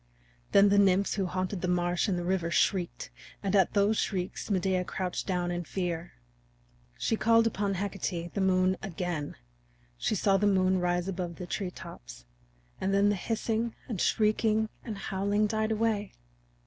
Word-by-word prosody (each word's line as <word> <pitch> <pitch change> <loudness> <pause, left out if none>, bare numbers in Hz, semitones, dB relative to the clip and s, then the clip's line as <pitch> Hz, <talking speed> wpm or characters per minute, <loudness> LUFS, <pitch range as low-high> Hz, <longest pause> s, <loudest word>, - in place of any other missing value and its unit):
Then 200 0 +6
the 200 0 +4
nymphs 195 0 +3
who 195 -3 -1
haunted 185 +1 -3
the 180 - -1
marsh 175 +1 +1
and 190 -3 0
the 175 - -2
river 175 -1 0
shrieked, 180 0 0 0.3
and 195 0 0
at 190 -3 +4
those 205 +1 +3
shrieks 185 0 -3
Medea 185 -2 +1
crouched 180 0 -3
down 180 -2 0
in 175 0 -2
fear. 175 -1 -3 0.8
She 225 - 0
called 230 +1 +4
upon 200 -3 0
Hecate, 180 -3 -3
the 200 - -1
Moon, 185 0 +3
again. 175 -5 -4 0.6
She - - 0
saw 195 0 +3
the 205 +1 +2
moon 185 -1 +3
rise 175 0 0
above 180 -3 -3
the 180 - -6
treetops, - - -7 0.5
and 195 +1 0
then 200 +1 +4
the 205 - +2
hissing 225 +3 -2
and 215 -8 -3
shrieking 215 0 +2
and 215 -3 -5
howling 200 +2 0
died 215 +1 0
away. 215 -2 0
190 Hz, 160 wpm, -29 LUFS, 180-205 Hz, 0.8 s, Then